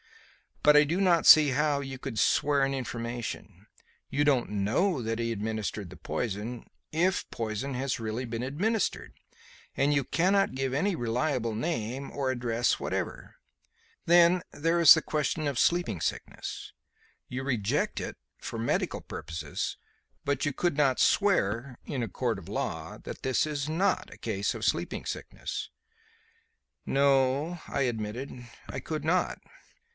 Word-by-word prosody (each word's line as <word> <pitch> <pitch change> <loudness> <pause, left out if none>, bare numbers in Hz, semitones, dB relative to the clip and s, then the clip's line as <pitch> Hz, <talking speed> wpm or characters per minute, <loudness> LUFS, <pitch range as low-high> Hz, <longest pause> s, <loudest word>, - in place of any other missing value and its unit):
But 150 0 +7
I 150 - +8
do 165 +5 -1
not 175 -3 +4
see 155 -2 +9
how 145 +1 +1
you 135 -1 -6
could 130 -4 -6
swear 140 +5 +3
an 135 0 +1
information. 120 -2 -5 0.4
You 145 +2 +1
don't 140 -5 +2
know 125 - +1
that 115 0 -2
he 115 0 -1
administered 110 -2 -3
the 95 - -11
poison 110 +7 -4 0.2
if 175 +4 +1
poison 115 +4 -3
has 130 0 -1
really 115 +3 -3
been 115 0 -4
administered 165 - -1 0.6
and 140 +2 +3
you 140 -1 +2
cannot 195 +5 +2
give 135 0 -1
any 185 +7 +1
reliable 120 -1 -1
name 130 -1 -3
or 135 -2 -1
any 130 - -1
address 120 0 +1
whatever. - - -4 0.7
Then 175 +1 +6
there 165 +3 +1
is 165 -3 +11
the - - +1
question 155 0 -1
of 140 -3 -2
sleeping 175 - +2
sickness. - - -4 0.5
You 130 +1 -4
reject 120 -7 0
it - - -5 0.2
for - - -6
medical 115 - -1
purposes, 80 - -5 0.5
but 140 0 0
you 145 - 0
could 175 +1 0
not 135 -4 +3
swear, 125 - +2
in 135 -4 -3
a - - -2
court 115 +2 -1
of 95 - -10
law, - - -4
that - - -8
this 130 -2 +1
is 150 -1 -3
not 180 +6 0
a - - -14
case 100 -3 -1
of - - -4
sleeping - - -1
sickness." - - -5 1.2
"No," 140 +4 +2
I - - -2
admitted, 120 +1 -3 0.2
"I - - -5
could 155 -1 -4
not." 175 +2 +1
135 Hz, 150 wpm, -29 LUFS, 115-155 Hz, 1.2 s, is